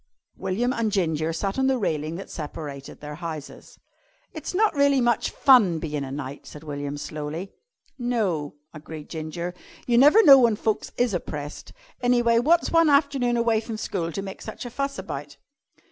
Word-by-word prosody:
William 215 Hz, +7 st, -1 dB
and 230 Hz, -4 st, -1 dB
Ginger 160 Hz, -5 st, 0 dB
sat 195 Hz, +8 st, -2 dB
on 265 Hz, -, +2 dB
the 265 Hz, -1 st, +2 dB
railing 155 Hz, -7 st, -2 dB
that 195 Hz, -, -8 dB
separated 145 Hz, -3 st, -7 dB
their 150 Hz, 0 st, -7 dB
houses. 155 Hz, -2 st, -8 dB, 0.6 s
"It's -, -, -6 dB
not 425 Hz, 0 st, +3 dB
really 280 Hz, -2 st, +3 dB
much 240 Hz, -2 st, +1 dB
fun 220 Hz, -11 st, +5 dB
bein' 150 Hz, -3 st, -3 dB
a 135 Hz, -, -6 dB
knight," 140 Hz, 0 st, -6 dB
said 150 Hz, -, -11 dB
William 145 Hz, -1 st, -5 dB
slowly. 155 Hz, +6 st, -6 dB, 0.5 s
"No," 200 Hz, -13 st, -1 dB, 0.2 s
agreed 155 Hz, -1 st, -9 dB
Ginger. 170 Hz, +2 st, -5 dB, 0.3 s
"You 240 Hz, -1 st, +3 dB
never 300 Hz, -, +7 dB
know 275 Hz, -4 st, +9 dB
when 235 Hz, -3 st, +4 dB
folks 215 Hz, 0 st, -2 dB
is 245 Hz, -3 st, +1 dB
oppressed. 150 Hz, -4 st, -5 dB, 0.3 s
An' 245 Hz, 0 st, +3 dB
anyway, 235 Hz, -1 st, +3 dB
wot's 330 Hz, +7 st, +3 dB
one 330 Hz, -1 st, +5 dB
afternoon 280 Hz, -4 st, +2 dB
away 230 Hz, -2 st, +2 dB
from 225 Hz, -1 st, -6 dB
school 175 Hz, -5 st, -3 dB
to 195 Hz, -, -4 dB
make 195 Hz, -1 st, -8 dB
such 220 Hz, -, -7 dB
a 245 Hz, -, -6 dB
fuss 275 Hz, +3 st, -3 dB
about?" 145 Hz, -6 st, -7 dB
195 Hz, 175 wpm, -25 LUFS, 155-245 Hz, 0.6 s, know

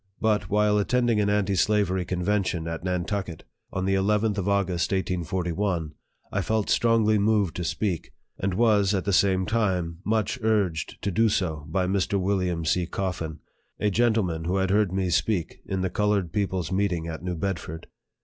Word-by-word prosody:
But, 105 Hz, -4 st, +1 dB
while 105 Hz, 0 st, +3 dB
attending 120 Hz, 0 st, +2 dB
an 100 Hz, -, +1 dB
anti 105 Hz, -1 st, +1 dB
slavery 95 Hz, -2 st, +1 dB
convention 90 Hz, -2 st, -1 dB
at 80 Hz, 0 st, -4 dB
Nantucket, 90 Hz, -1 st, -3 dB, 0.3 s
on 95 Hz, 0 st, -2 dB
the 95 Hz, -, +1 dB
llth 105 Hz, +2 st, +2 dB
of 100 Hz, +1 st, -1 dB
August, 95 Hz, -5 st, 0 dB
1841, 90 Hz, -2 st, -1 dB, 0.4 s
1 100 Hz, -, 0 dB
felt 110 Hz, +3 st, 0 dB
strongly 110 Hz, -2 st, +3 dB
moved 105 Hz, -4 st, +2 dB
to 90 Hz, -, -2 dB
speak, 90 Hz, 0 st, -2 dB, 0.3 s
and 95 Hz, -1 st, -1 dB
was 105 Hz, -3 st, +3 dB
at 95 Hz, -, -2 dB
the 100 Hz, -, 0 dB
same 95 Hz, 0 st, +3 dB
time 90 Hz, -7 st, 0 dB
much 110 Hz, +3 st, 0 dB
urged 100 Hz, -8 st, 0 dB
to 100 Hz, -, 0 dB
do 110 Hz, +5 st, +3 dB
so 80 Hz, -7 st, -1 dB
by 95 Hz, -1 st, 0 dB
Mr. 100 Hz, +1 st, 0 dB
William 90 Hz, -3 st, 0 dB
C. 85 Hz, +2 st, +1 dB
Coffin, 85 Hz, -5 st, -4 dB, 0.4 s
a 105 Hz, 0 st, +1 dB
gentleman 105 Hz, -8 st, +1 dB
who 90 Hz, +3 st, 0 dB
had 95 Hz, 0 st, +1 dB
heard 105 Hz, -2 st, +3 dB
me 95 Hz, -1 st, -1 dB
speak 90 Hz, 0 st, 0 dB
in 95 Hz, -1 st, -2 dB
the 95 Hz, -, -1 dB
colored 105 Hz, -5 st, 0 dB
people's 95 Hz, -5 st, -1 dB
meeting 95 Hz, -4 st, 0 dB
at 80 Hz, -1 st, -5 dB
New 90 Hz, -1 st, -2 dB
Bedford. 80 Hz, -2 st, -4 dB
95 Hz, 170 wpm, -26 LUFS, 90-105 Hz, 0.4 s, while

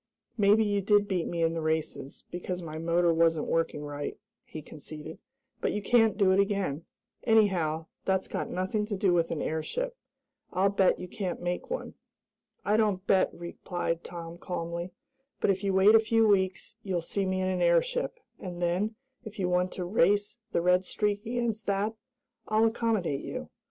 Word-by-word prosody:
"Maybe 210 Hz, 0 st, +4 dB
you 205 Hz, -1 st, +1 dB
did 205 Hz, +1 st, +3 dB
beat 180 Hz, -4 st, -1 dB
me 170 Hz, -1 st, -1 dB
in 165 Hz, 0 st, +2 dB
the 165 Hz, -, -2 dB
races, 155 Hz, -3 st, -2 dB
because 180 Hz, 0 st, -4 dB
my 155 Hz, -1 st, -6 dB
motor 170 Hz, +1 st, +2 dB
wasn't 165 Hz, -1 st, +3 dB
working 165 Hz, -2 st, 0 dB
right," 145 Hz, 0 st, -5 dB, 0.3 s
he 155 Hz, -, -9 dB
conceded, 155 Hz, +1 st, -9 dB, 0.4 s
"but -, -, 0 dB
you 210 Hz, -, -2 dB
can't 225 Hz, -2 st, +4 dB
do 195 Hz, -3 st, +4 dB
it 190 Hz, -, +4 dB
again. 195 Hz, -7 st, 0 dB, 0.4 s
Anyhow, 180 Hz, -8 st, +2 dB, 0.2 s
that's 190 Hz, 0 st, 0 dB
got -, -, -3 dB
nothing 185 Hz, +4 st, -1 dB
to 210 Hz, -, -2 dB
do 190 Hz, -2 st, +3 dB
with 170 Hz, -1 st, +2 dB
an 155 Hz, -, -2 dB
airship. 475 Hz, -, -2 dB, 0.6 s
I'll 195 Hz, +1 st, +2 dB
bet 195 Hz, -2 st, +3 dB
you 180 Hz, -, -6 dB
can't 185 Hz, -1 st, -4 dB
make 175 Hz, 0 st, -3 dB
one!" -, -, -4 dB, 0.7 s
"I 210 Hz, +1 st, +3 dB
don't 205 Hz, -4 st, +1 dB
bet," 190 Hz, -2 st, +4 dB
replied 170 Hz, -1 st, -4 dB
Tom 170 Hz, -1 st, -8 dB
calmly, 170 Hz, 0 st, -4 dB, 0.5 s
"but -, -, +3 dB
if 190 Hz, +1 st, -2 dB
you 200 Hz, -, +1 dB
wait 190 Hz, +3 st, +6 dB
a 225 Hz, -, +8 dB
few 225 Hz, 0 st, +3 dB
weeks 190 Hz, -1 st, +1 dB
you'll 185 Hz, -5 st, -1 dB
see 195 Hz, +2 st, -1 dB
me 185 Hz, 0 st, 0 dB
in 185 Hz, -, 0 dB
an 185 Hz, -1 st, 0 dB
airship, 175 Hz, -, +2 dB, 0.2 s
and 180 Hz, -2 st, -6 dB
then, 180 Hz, +6 st, 0 dB, 0.3 s
if 215 Hz, -2 st, -9 dB
you 185 Hz, -3 st, 0 dB
want 180 Hz, 0 st, +1 dB
to 180 Hz, -, -4 dB
race 205 Hz, +4 st, +2 dB
the -, -, +1 dB
Red 180 Hz, +1 st, +4 dB
Streak 205 Hz, +1 st, -1 dB
against 235 Hz, -2 st, -2 dB
that, 200 Hz, +2 st, 0 dB, 0.5 s
I'll 215 Hz, +1 st, +3 dB
accommodate 220 Hz, -10 st, 0 dB
you. -, -, -6 dB
185 Hz, 180 wpm, -29 LUFS, 170-205 Hz, 0.7 s, a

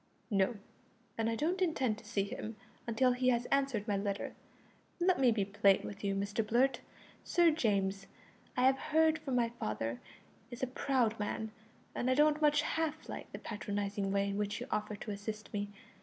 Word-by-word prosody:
"No, 195 Hz, +3 st, +2 dB, 0.6 s
and 225 Hz, 0 st, 0 dB
I 230 Hz, -, 0 dB
don't 345 Hz, +9 st, 0 dB
intend 265 Hz, -11 st, +1 dB
to -, -, -17 dB
see 205 Hz, -2 st, 0 dB
him 215 Hz, +2 st, -5 dB, 0.3 s
until 250 Hz, +2 st, +3 dB
he 250 Hz, +1 st, +2 dB
has 240 Hz, -1 st, +2 dB
answered 270 Hz, -6 st, +1 dB
my 205 Hz, -, +1 dB
letter. 200 Hz, 0 st, -2 dB, 0.7 s
Let 360 Hz, -1 st, +3 dB
me 260 Hz, -2 st, +5 dB
be 210 Hz, -3 st, +1 dB
plain 200 Hz, -1 st, +3 dB
with 105 Hz, -1 st, -7 dB
you, 195 Hz, -1 st, 0 dB
Mr 200 Hz, +3 st, -1 dB
Blurt. 245 Hz, +5 st, +2 dB, 0.4 s
Sir 345 Hz, -2 st, +4 dB
James, 200 Hz, -9 st, 0 dB, 0.5 s
I 250 Hz, -, +3 dB
have 265 Hz, +1 st, +5 dB
heard 320 Hz, +1 st, +3 dB
from 270 Hz, -4 st, -3 dB
my 235 Hz, -1 st, +3 dB
father, 115 Hz, +2 st, -2 dB, 0.5 s
is 240 Hz, +1 st, -7 dB
a 255 Hz, 0 st, -2 dB
proud 245 Hz, -6 st, +1 dB
man, 215 Hz, +1 st, -2 dB, 0.4 s
and 255 Hz, -, -1 dB
I 255 Hz, -, +4 dB
don't 300 Hz, +1 st, +4 dB
much 300 Hz, 0 st, +4 dB
[half] 315 Hz, -1 st, -2 dB
like -, -, -7 dB
the -, -, -6 dB
patronising 205 Hz, -2 st, -3 dB
way 200 Hz, 0 st, +2 dB
in 200 Hz, +1 st, -2 dB
which 205 Hz, 0 st, -1 dB
he -, -, -4 dB
offered 210 Hz, -1 st, -2 dB
to 215 Hz, -, -4 dB
assist 210 Hz, +1 st, -6 dB
me. 205 Hz, 0 st, -2 dB
225 Hz, 185 wpm, -34 LUFS, 200-270 Hz, 0.7 s, me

